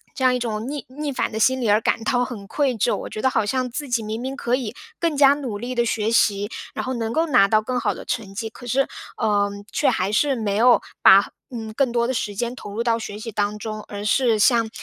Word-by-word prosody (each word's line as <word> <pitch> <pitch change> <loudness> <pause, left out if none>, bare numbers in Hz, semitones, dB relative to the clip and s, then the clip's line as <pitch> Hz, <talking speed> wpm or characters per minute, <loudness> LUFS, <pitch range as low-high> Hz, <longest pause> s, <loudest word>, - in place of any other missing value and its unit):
这 265 - -3
样 255 - +5
一 250 - 0
种 225 0 -3
逆 285 -4 -5
逆 290 +3 -4
反 260 - -1
的 220 - -6
心 260 +3 +3
理 235 - -1
而 210 +2 +4
感 225 - 0
到 245 +1 +2
很 220 -6 -7
愧 275 +2 0
疚。 235 - +2
我 - - -6
觉 215 - -5
得 260 - +3
好 215 - +1
像 255 +3 -1
自 275 +3 -5
己 240 -2 +1
明 220 +2 -4
明 265 +1 -4
可 240 +1 0
以 240 -4 -4 0.2
更 330 -4 -1
加 280 -1 +7
努 260 -8 -4
力 245 +4 -5
地 240 0 +2
学 220 -1 0
习， 205 -2 +2 0.2
然 - - -4
后 260 - -2
能 225 -2 -2
够 320 +7 +1
拿 200 -8 +5
到 215 0 +4
更 250 +3 -3
好 - - +1
的 - - -10
成 210 -5 -4
绩。 220 +2 -4
可 245 - -13
是， 265 +3 +1 0.3
呃， 205 -1 +1 0.2
却 - - +2
还 185 +2 0
是 280 +5 +3
没 210 -4 -1
有 240 +3 +5 0.2
把， 195 +1 +7 0.3
嗯， 220 -2 -6
更 265 -2 +1
多 235 0 +1
的 260 - -1
时 210 -3 -2
间 235 +4 -3
投 205 -5 -9
入 220 +3 -3
到 235 -1 +1
学 210 -2 -6
习 225 +1 -6
当 210 +1 -1
中， 215 0 -5
而 205 0 -6
是 230 0 +2
像， 230 +1 +4
230 Hz, 285 characters per minute, -22 LUFS, 210-255 Hz, 0.3 s, 加